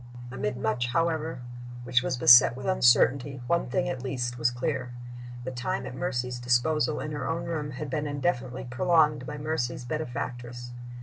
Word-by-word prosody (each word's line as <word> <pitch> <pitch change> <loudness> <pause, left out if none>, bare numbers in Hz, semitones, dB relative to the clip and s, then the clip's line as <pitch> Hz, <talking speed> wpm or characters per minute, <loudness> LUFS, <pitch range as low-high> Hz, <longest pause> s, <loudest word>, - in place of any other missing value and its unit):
Amid 120 -2 -3
much, 120 +2 -1
however, 160 0 -1 0.4
which 125 0 +2
was 130 0 -2
beset 120 0 +8
with 130 - -7
uncertainty, 135 -4 +3
one 170 +4 +1
thing 180 +7 0
at 155 -8 -3
least 125 -2 -3
was 120 +1 +3
clear. 125 0 -3 0.5
The 130 - -4
time 125 0 -3
at - - -6
Mercy's 125 -5 -2
disposal 150 +6 +1
in 150 - -4
her 145 -3 -3
own 170 +1 -2
room 155 -3 -3
had 140 0 -6
been 150 0 -1
indefinitely 135 -4 -2
prolonged 150 +1 +2
by 150 - -5
Mercy's 145 -5 -2
benefactress. 120 -4 -5
130 Hz, 165 wpm, -27 LUFS, 120-155 Hz, 0.5 s, beset